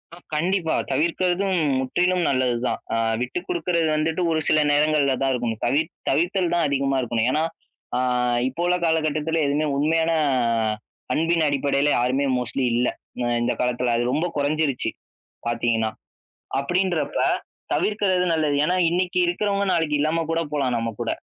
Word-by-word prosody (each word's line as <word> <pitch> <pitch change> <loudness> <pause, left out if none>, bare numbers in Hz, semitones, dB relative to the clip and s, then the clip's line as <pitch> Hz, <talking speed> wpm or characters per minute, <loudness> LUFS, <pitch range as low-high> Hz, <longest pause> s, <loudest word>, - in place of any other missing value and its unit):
ஆ - - -15 0.2
கண்டிப்பா, 170 +1 0 0.2
தவிர்க்கிறதும் 180 +6 +1 0.2
முற்றிலும் 180 +8 +1
நல்லது 130 -3 +1
தான், - - -1
அ 115 - +1 0.2
விட்டு 125 +7 -2
குடுக்குறது 170 -1 0
வந்துட்டு 160 +3 0
ஒரு 160 - +1
சில 155 - +4
நேரங்கள்ல 145 -2 +3
தான் 135 - +2
இருக்கணும். 120 -2 -3
தவிர்த் 145 +6 +1 0.2
தவிர்த்தல் 175 +4 +1
தான் 170 -2 +2
அதிகமா 135 -1 0
இருக்கணும். 120 -1 0
ஏன்னா, 155 +3 +1 0.5
ஆ - - +1 0.5
இப்போ 165 +7 -6
உள்ள 180 0 +2
காலகட்டத்தில 160 0 0
எதுவுமே 150 +2 0
உண்மையான 160 +3 +2 1.0
அன்பின் 165 0 +2
அடிப்படையில 140 0 +1
யாருமே 130 +3 +1
மோஸ்ட்லி 125 +2 -2
இல்ல. 125 +1 +2 0.4
அ - - 0 0.2
இந்த 120 +1 +1
காலத்தில 125 -1 0
அது 120 - 0
ரொம்ப 165 - 0
கொறஞ்சிருச்சு, 145 -2 0 0.6
பாத்தீங்கன்னா. 115 -2 0 0.7
அப்டின்றப்ப 175 +3 -1 0.6
தவிர்க்கிறது 190 -4 +1
நல்லது. 155 -2 +1
ஏன்னா, 180 +4 +1
இன்னிக்கு 180 +1 0
இருக்கிறவங்க 200 +3 0
நாளைக்கு 155 -3 +1
இல்லாம 160 +2 +1
கூட 165 0 +1
போலாம் 135 -4 0
நம்ம 115 0 -1
கூட. - - -2
155 Hz, 145 wpm, -23 LUFS, 130-170 Hz, 1.0 s, சில